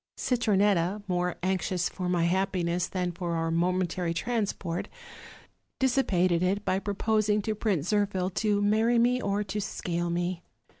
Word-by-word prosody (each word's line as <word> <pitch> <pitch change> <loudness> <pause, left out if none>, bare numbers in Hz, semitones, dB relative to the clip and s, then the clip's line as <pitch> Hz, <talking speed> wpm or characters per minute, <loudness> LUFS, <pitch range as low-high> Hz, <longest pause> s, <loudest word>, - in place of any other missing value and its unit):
Citronetta, 205 -5 +1
more 180 -1 0
anxious 185 -1 0
for 180 -2 -4
my 175 -2 +2
happiness 180 -1 0
than 180 -2 -2
for 175 -1 -3
our 165 0 -1
momentary 175 0 0
trans 220 +3 0
port, 170 -2 -4 0.9
dissipated 185 -10 +2
it 195 +3 0
by 190 - +1
proposing 210 +1 +1
to 220 - -1
Prince 200 -6 -1
Zirphil 195 -3 0
to 205 -1 +1
marry 220 +3 +3
me 245 +2 +3
or 200 -1 0
to 210 +1 -3
scale 175 -3 -3
me. 175 +1 -2
185 Hz, 145 wpm, -28 LUFS, 175-210 Hz, 0.9 s, marry